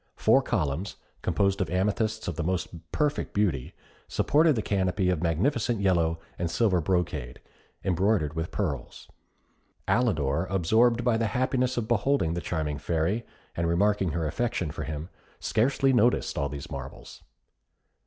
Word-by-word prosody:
Four 115 +5 +4
columns, 90 - -2 0.3
composed 100 0 +1
of 95 - -1
amethysts 105 +4 0
of 90 - -2
the 85 - -2
most 85 -2 -1 0.2
perfect 150 -1 -1
beauty, 90 -11 0 0.3
supported 150 -2 +3
a 110 - -1
canopy 95 -1 +1
of 85 -4 -1
magnificent 110 - +1
yellow 85 -4 +2 0.2
and 85 -1 -1
silver 95 -3 +2
brocade, 75 -8 -1 0.4
embroidered 95 -4 +1
with 80 +1 -3
pearls. - - -4 0.8
Alidor, 85 - +1
absorbed 110 +6 +3
by 120 -2 +2
the 115 0 +1
happiness 130 0 +1
of 115 -2 -1
beholding 120 - +1
the 85 - -3
charming 75 -4 -2
Fairy, 85 +9 -1 0.3
and 85 0 0
remarking 95 +2 +2
her 80 0 -1
affection 90 -1 -1
for - - -5
him, 80 +2 -5 0.3
scarcely 135 +3 +2
noticed 120 0 +2
all 70 - -1
these 70 0 -7
marvels. - - -8
95 Hz, 145 wpm, -27 LUFS, 80-115 Hz, 0.8 s, Four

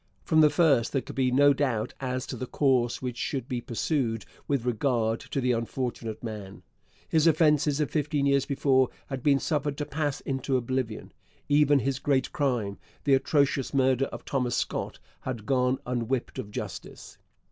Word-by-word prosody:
From 155 0 +4
the 150 - +7
first 145 -9 +3
there 135 - +1
could - - -9
be 130 -1 +2
no 140 +3 +5
doubt 130 -6 -1
as 130 -1 -2
to - - -5
the 125 +1 -5
course 130 -4 +1
which 125 -2 -3
should 130 -1 -3
be 125 -4 -3
pursued 120 -2 -1 0.2
with 140 -4 0
regard 115 -2 +1
to - - -4
the 125 -1 +1
unfortunate 115 -1 -3
man. 105 -4 -7 0.4
His 160 0 +3
offences 150 -2 +3
of 150 - 0
fifteen 150 -2 0
years 140 -1 +2
before 130 -2 +3 0.2
had 135 -2 -4
been 140 0 +4
suffered 145 -1 -1
to 150 - -2
pass 145 -1 -2
into 135 0 -1
oblivion. 125 -2 -3 0.4
Even 145 0 +5
his 135 +1 -1
great 135 -2 +1
crime 120 -9 -1 0.2
the 140 - +3
atrocious 140 0 +2
murder 130 0 +3
of - - -9
Thomas 125 -4 0
Scott - - -2 0.2
had 120 -5 -5
gone 125 +1 +2
unwhipped 125 0 -2
of 100 - -5
justice. - - -8
130 Hz, 170 wpm, -27 LUFS, 120-145 Hz, 0.4 s, the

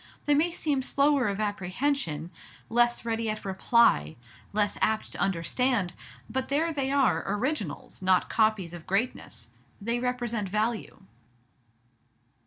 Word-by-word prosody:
They 295 - +4
may 305 +4 +3
seem 300 -5 -1
slower 280 -1 +2
of 200 0 -2
apprehension, 190 - -1 0.4
less 240 +1 +2
ready 225 -1 -1
at 215 -1 -4
reply, 190 - +3 0.4
less 205 0 +1
apt 220 0 +1
to - - -7
understand; 195 +2 0 0.3
but 260 0 -3
there 320 +4 +1
they 275 -2 -1
are, 275 -2 +3
Originals, 210 - -3
not 185 -1 +3
Copies 215 -6 +1
of 175 -2 -9
greatness. 200 +7 -2 0.3
They 235 +3 -1
represent 240 -5 -2
value." 215 +3 -2
225 Hz, 125 wpm, -28 LUFS, 195-260 Hz, 0.4 s, They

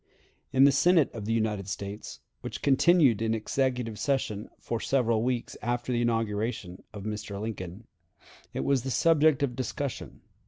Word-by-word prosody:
In 135 0 +5
the 140 - +7
Senate 160 +2 +4
of 110 -3 -6
the 110 - -2
United 110 -4 0
States, 100 +1 -6 0.2
which - - -7
continued 140 - +4
in 115 0 +1
executive 125 -1 -1
session 120 -7 -1
for 115 - -3
several 115 -4 +1
weeks 120 0 -2
after 120 +2 -2
the 120 - +1
inauguration 110 -5 -1
of 105 -2 -8
Mr. 105 -1 -5
Lincoln, 100 -1 -6 0.7
it - - -3
was 140 -2 +2
the 135 - -4
subject 155 +1 +4
of 125 -4 -1
discussion. 130 +1 -4
115 Hz, 155 wpm, -28 LUFS, 105-135 Hz, 0.7 s, the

